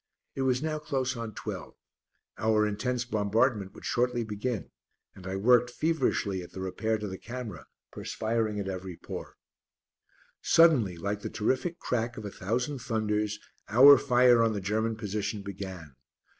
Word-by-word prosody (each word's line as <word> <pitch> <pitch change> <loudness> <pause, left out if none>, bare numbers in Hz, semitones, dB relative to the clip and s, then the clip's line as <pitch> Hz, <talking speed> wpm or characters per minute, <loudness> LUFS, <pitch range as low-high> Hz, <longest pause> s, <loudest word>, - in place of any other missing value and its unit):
It 135 - -4
was 130 +1 +1
now 155 -1 -1
close 135 -4 -1
on 115 -3 -6
twelve; - - -6 0.6
our 110 -1 +2
intense 120 +4 -1
bombardment 110 -2 +1
would - - -11
shortly 120 -1 +1
begin, 110 +1 -4 0.4
and 95 -1 -11
I 95 - -3
worked 120 +4 +4
feverishly 120 - 0
at 90 - -11
the - - -7
repair 110 +4 -1
to 105 0 -5
the 95 -1 -6
camera, 120 -2 -7 0.2
perspiring 110 -1 -2
at 100 - -3
every 95 -2 -5
pore. - - -8 1.0
Suddenly, 130 - +5
like 100 +4 -3
the - - -4
terrific 130 +10 -1
crack 120 0 -2
of 110 - -6
a 100 - -5
thousand 125 +10 -2
thunders, 105 -2 -1 0.3
our 135 +6 +9
fire 125 -3 +5
on 115 -1 +3
the 105 - -2
German 110 +4 -1
position 105 -1 -3
began. 95 -7 -7
110 Hz, 155 wpm, -29 LUFS, 100-125 Hz, 1.0 s, our